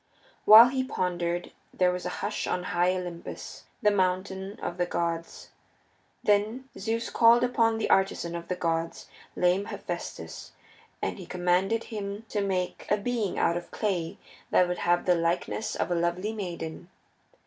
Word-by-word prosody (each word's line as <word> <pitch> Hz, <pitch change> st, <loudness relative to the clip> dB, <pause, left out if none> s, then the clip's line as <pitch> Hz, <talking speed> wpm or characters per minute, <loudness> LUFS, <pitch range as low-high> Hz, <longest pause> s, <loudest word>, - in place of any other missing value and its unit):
While 225 Hz, +3 st, +10 dB
he 260 Hz, 0 st, 0 dB
pondered 175 Hz, -7 st, -2 dB, 0.2 s
there 180 Hz, -1 st, +2 dB
was 180 Hz, 0 st, -4 dB
a 180 Hz, -, -5 dB
hush 210 Hz, -, -2 dB
on 180 Hz, -, -1 dB
high 180 Hz, +1 st, +3 dB
Olympus, 175 Hz, -2 st, -7 dB, 0.2 s
the 210 Hz, -, +5 dB
mountain 190 Hz, +1 st, -1 dB
of 175 Hz, -, -4 dB
the 175 Hz, 0 st, 0 dB
gods. 170 Hz, -1 st, -3 dB, 0.7 s
Then 215 Hz, +6 st, +1 dB
Zeus 225 Hz, +3 st, -2 dB
called 235 Hz, +1 st, +6 dB
upon 230 Hz, -2 st, +2 dB
the 225 Hz, -, -1 dB
artisan 190 Hz, -3 st, +1 dB
of 170 Hz, 0 st, -6 dB
the 180 Hz, -, -1 dB
gods, 165 Hz, -1 st, -2 dB, 0.3 s
lame 180 Hz, +3 st, +2 dB
Hephaestus, -, -, -6 dB, 0.5 s
and -, -, -2 dB
he 180 Hz, -, -9 dB
commanded 180 Hz, +5 st, +1 dB
him 205 Hz, -1 st, -6 dB
to 205 Hz, -, -1 dB
make 185 Hz, -2 st, -2 dB
a 210 Hz, -, +3 dB
being 220 Hz, -2 st, -2 dB
out 170 Hz, -, +2 dB
of 175 Hz, -, -7 dB
clay 180 Hz, -6 st, -2 dB, 0.3 s
that 180 Hz, -, +4 dB
would 180 Hz, 0 st, -3 dB
have 175 Hz, 0 st, +2 dB
the 180 Hz, -, +5 dB
likeness 175 Hz, +5 st, -1 dB
of 175 Hz, -, -2 dB
a -, -, +3 dB
lovely 175 Hz, +5 st, -1 dB
maiden. 175 Hz, -4 st, -6 dB
185 Hz, 160 wpm, -28 LUFS, 175-210 Hz, 0.7 s, While